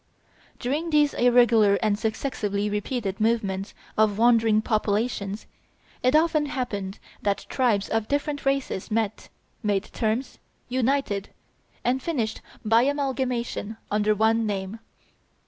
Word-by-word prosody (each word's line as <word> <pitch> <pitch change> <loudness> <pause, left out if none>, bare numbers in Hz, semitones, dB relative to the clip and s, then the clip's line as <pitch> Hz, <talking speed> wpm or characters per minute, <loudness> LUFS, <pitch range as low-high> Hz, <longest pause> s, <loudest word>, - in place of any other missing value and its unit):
During 295 +7 -2
these 295 -2 +3
irregular 235 -4 +5
and 210 0 +1
successively 210 -3 -2
repeated 210 -1 -2
movements 205 -4 0 0.2
of 215 -2 +3
wandering 225 -2 +4
populations, 210 -2 -1 0.6
it 255 +3 +3
often 310 -2 +3
happened 205 -8 -3 0.2
that 200 -1 -1
tribes 225 -7 +1
of 225 -1 -1
different 285 0 -1
races 275 -8 -1
met, 215 -1 -2 0.3
made 205 -4 +1
terms, 230 +3 -2 0.3
united, 250 -5 0 0.5
and 255 +2 +1
finished 245 -9 -2 0.2
by 225 +2 +5
amalgamation 255 -5 -1
under 210 0 +2
one 220 +1 +2
name. 195 +1 -3
225 Hz, 110 wpm, -25 LUFS, 210-255 Hz, 0.6 s, irregular